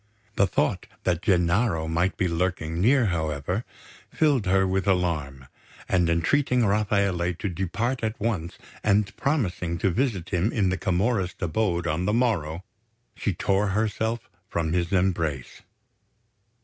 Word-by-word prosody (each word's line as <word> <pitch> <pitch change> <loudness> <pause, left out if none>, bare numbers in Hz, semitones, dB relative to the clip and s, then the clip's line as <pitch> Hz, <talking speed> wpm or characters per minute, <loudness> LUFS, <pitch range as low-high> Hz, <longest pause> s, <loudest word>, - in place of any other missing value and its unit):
The 100 - +3
thought - - 0 0.2
that 90 -2 0
Gennaro 90 -1 +2
might 85 +4 0
be 95 - +1
lurking 85 -1 -1
near, 125 +4 +4
however, 80 - -2 0.5
filled 145 -10 +2
her 95 +1 +3
with 95 +1 -1
alarm; 75 -8 0 0.4
and 90 -3 +2
entreating 125 - +2
Rafaele 100 -4 +1
to 105 - -4
depart 115 +8 -2
at 110 +1 -2
once 95 -7 -2 0.3
and 105 -1 +2
promising 95 - -1
to 95 +3 +1
visit 100 -5 -1
him 90 +5 +1
in 100 -5 +1
the 95 - 0
Camorrist 95 0 0
abode 85 0 0
on 85 +2 -1
the 105 - +1
morrow, 95 -9 0 0.5
she 100 - -2
tore 100 +4 +1
herself 110 +3 -1 0.2
from 80 -1 -1
his 85 -1 0
embrace. 85 -8 -1
95 Hz, 135 wpm, -25 LUFS, 85-105 Hz, 0.5 s, near